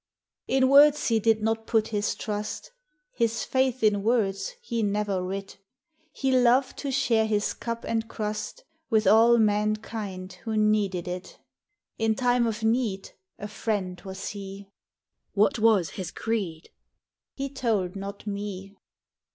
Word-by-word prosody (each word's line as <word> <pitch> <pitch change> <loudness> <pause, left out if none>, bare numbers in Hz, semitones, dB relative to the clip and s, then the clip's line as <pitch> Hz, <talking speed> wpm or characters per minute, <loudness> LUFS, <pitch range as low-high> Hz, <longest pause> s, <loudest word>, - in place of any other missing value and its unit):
In 265 -1 +3
words 285 +1 +6
he 225 -1 +3
did 220 0 +2
not 225 0 -1
put 225 -1 +1
his 210 -1 -1
trust; 210 0 -5 0.4
His 230 -2 0
faith 260 -2 0
in 205 -2 +3
words 220 - 0
he 235 - -3
never 205 -2 0
writ; 195 +1 -6 0.5
He 270 -2 -1
loved 255 +1 +3
to 280 - -3
share 230 -4 +2
his 210 -1 0
cup 230 0 -5
and 225 0 -1
crust 210 -1 -5 0.3
W 220 -3 +4
T - - -4
ith - - -1
all 230 +2 +6
mankind 210 -3 -1
who 220 -1 -2
needed 205 -4 +1
it. 180 +1 -6 0.6
In 225 -1 +2
time 245 -1 +2
of 220 0 -3
need 220 -4 0 0.3
A 205 - -6
friend 200 -4 -3
was 190 0 -6
he. 200 -1 -8 0.3
" - - -54
What 210 +3 +2
was 215 -7 +3
his 185 -4 -5
creed? 185 -7 -3 0.3
" - - -66
He 275 0 -3
told 220 -9 -1
not 200 +1 -7
me. 200 -1 -5
215 Hz, 150 wpm, -26 LUFS, 200-230 Hz, 0.6 s, words